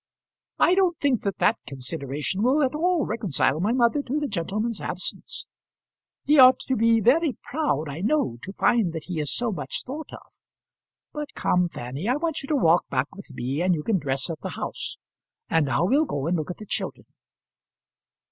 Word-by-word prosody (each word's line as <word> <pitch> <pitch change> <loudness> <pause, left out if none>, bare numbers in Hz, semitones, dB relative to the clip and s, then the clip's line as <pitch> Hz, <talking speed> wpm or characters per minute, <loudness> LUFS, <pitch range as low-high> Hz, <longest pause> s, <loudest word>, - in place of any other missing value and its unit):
"I 355 - +4
don't 370 -3 +2
think 275 -5 +1
that 200 -2 -2
that 220 - +2
consideration 140 +6 -2
will 265 +6 +3
at 260 - +1
all 340 +1 +1
reconcile 170 - 0
my 200 +6 +1
mother 245 +3 +3
to 285 +2 -2
the 295 - -2
gentleman's 210 +4 -2
absence. - - -4 0.8
He 295 0 +5
ought 255 0 +9
to 265 - -1
be 230 0 +4
very 270 - +3
proud, 160 - -1
I 145 +2 -6
know, 210 - 0
to 195 - -8
find 205 -5 +2
that 160 - -5
he 175 -3 -4
is 145 -3 -1
so 240 -2 0
much 145 -8 -4
thought 295 +4 -7
of. - - -13 0.8
But 300 -2 -6
come, 180 -1 +1
Fanny, 135 - -5
I 250 - +3
want 320 0 -2
you 275 - -8
to 305 - +1
walk 175 - +3
back 130 +2 -1
with 200 - -11
me, 130 +3 -3
and 180 0 +3
you 150 - -4
can 210 -1 +1
dress 135 -3 0
at 160 - -6
the - - -4
house. - - -4 0.5
And 160 -3 +3
now 130 +6 +1
we'll 280 - +3
go 145 - -3
and 170 +2 +1
look 155 -1 -3
at 180 - -5
the 215 - -9
children." - - -4
205 Hz, 195 wpm, -25 LUFS, -, 0.8 s, ought